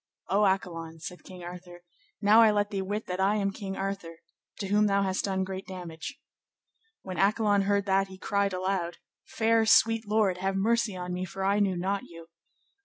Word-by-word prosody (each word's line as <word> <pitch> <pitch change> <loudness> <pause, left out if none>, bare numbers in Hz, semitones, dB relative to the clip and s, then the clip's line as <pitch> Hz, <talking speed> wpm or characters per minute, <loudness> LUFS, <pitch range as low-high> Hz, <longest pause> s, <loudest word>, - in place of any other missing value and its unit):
O 205 +3 +3
Accolon, 165 -4 -2
said 180 +3 -8
King 180 -1 -11
Arthur, 175 0 -10 0.4
now 215 +3 +7
I 225 - +7
let 205 0 +1
thee 195 -1 -1
wit 205 +3 -3
that 180 0 -4
I 195 +2 +3
am 200 -2 0
King 195 -1 -6
Arthur, 195 -4 -4 0.4
to 195 - -4
whom 210 +1 +4
thou 200 0 +2
hast 190 -1 -1
done 190 -1 0
great 190 0 -6
damage. 175 -4 -7 0.8
When 185 -3 -6
Accolon 205 0 +3
heard 200 0 +1
that 195 0 +2
he 190 0 -11
cried 200 +1 0
aloud, 185 -2 -2 0.3
Fair, 225 0 +2
sweet 225 0 +4
lord, 205 -4 +2
have 190 +1 -1
mercy 220 +1 +1
on 180 0 -4
me, 180 +1 -3
for 190 +1 -4
I 200 +1 +2
knew 195 -3 +1
not 195 +3 -1
you. 165 -1 -13
195 Hz, 190 wpm, -28 LUFS, 180-205 Hz, 0.8 s, now